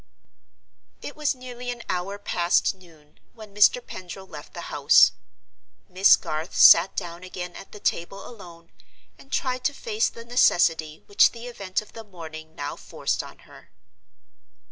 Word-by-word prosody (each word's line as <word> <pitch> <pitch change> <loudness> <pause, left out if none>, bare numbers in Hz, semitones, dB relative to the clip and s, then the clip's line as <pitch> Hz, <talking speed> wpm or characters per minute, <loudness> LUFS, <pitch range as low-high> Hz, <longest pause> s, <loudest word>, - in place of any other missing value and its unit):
It - - -7
was 300 -2 -1
nearly 250 -1 -8
an 240 -1 -5
hour 185 +3 -3
past 175 -3 +1
noon 165 -5 -21 0.2
when 215 -3 -13
Mr. 210 +4 +4
Pendril 185 +1 -9
left 150 -5 -12
the - - -8
house. - - +6 0.8
Miss 190 +2 +6
Garth 155 +3 -5
sat 170 +3 +7
down 175 -2 -5
again 180 -1 -7
at - - -11
the 210 - -11
table 195 +1 -3
alone, 170 -7 -14 0.5
and 275 - -18
tried 255 -1 -2
to 290 - 0
face 445 - -1
the 230 - -12
necessity 165 -10 +2
which 205 +2 +4
the 235 0 -10
event 200 -5 -4
of - - -20
the 225 - -9
morning 160 -5 -11
now 145 0 -5
forced - - -3
on - - -14
her. - - -17
195 Hz, 155 wpm, -24 LUFS, 170-235 Hz, 0.8 s, sat